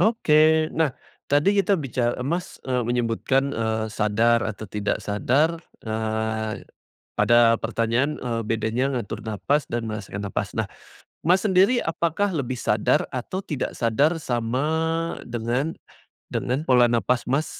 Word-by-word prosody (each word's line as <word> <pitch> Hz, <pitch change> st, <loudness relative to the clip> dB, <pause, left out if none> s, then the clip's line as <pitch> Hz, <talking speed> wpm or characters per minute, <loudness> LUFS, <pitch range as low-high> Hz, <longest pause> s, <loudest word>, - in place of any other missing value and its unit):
Oke. 155 Hz, -7 st, +4 dB
Nah, 160 Hz, -3 st, +2 dB, 0.4 s
tadi 145 Hz, +8 st, +4 dB
kita 200 Hz, -1 st, +2 dB
bica 120 Hz, -4 st, -1 dB
Mas, 175 Hz, +5 st, -3 dB
eee, 125 Hz, -1 st, 0 dB
menyebutkan, 120 Hz, +3 st, 0 dB
eee, 110 Hz, -1 st, -1 dB
sadar 110 Hz, +3 st, +2 dB
atau 110 Hz, 0 st, -4 dB
tidak 105 Hz, +1 st, -2 dB
sadar, 145 Hz, +11 st, +1 dB, 0.2 s
eee, 110 Hz, 0 st, -2 dB, 0.5 s
pada 120 Hz, -1 st, +5 dB
pertanyaan, 115 Hz, +6 st, 0 dB
eee, 115 Hz, -2 st, -2 dB
bedanya 115 Hz, +4 st, -1 dB
ngatur 110 Hz, 0 st, -6 dB
napas 115 Hz, +7 st, -1 dB
dan 120 Hz, -1 st, -2 dB
merasakan 100 Hz, -2 st, -5 dB
napas. 100 Hz, 0 st, -3 dB
Nah, 110 Hz, -, +1 dB, 0.6 s
Mas, 185 Hz, +2 st, +4 dB
sendiri 200 Hz, +5 st, +4 dB
apakah 170 Hz, +4 st, 0 dB
lebih 130 Hz, -5 st, -2 dB
sadar 105 Hz, -3 st, +1 dB
atau 155 Hz, +10 st, -4 dB
tidak 145 Hz, -7 st, -3 dB
sadar 140 Hz, +8 st, +2 dB
sama 120 Hz, +1 st, -1 dB, 0.6 s
dengan 120 Hz, +6 st, -2 dB, 0.6 s
dengan 135 Hz, +6 st, -1 dB
pola 125 Hz, -2 st, +5 dB
nafas, 120 Hz, +1 st, +1 dB
Mas, 145 Hz, +4 st, +1 dB
120 Hz, 130 wpm, -24 LUFS, 110-150 Hz, 0.6 s, pada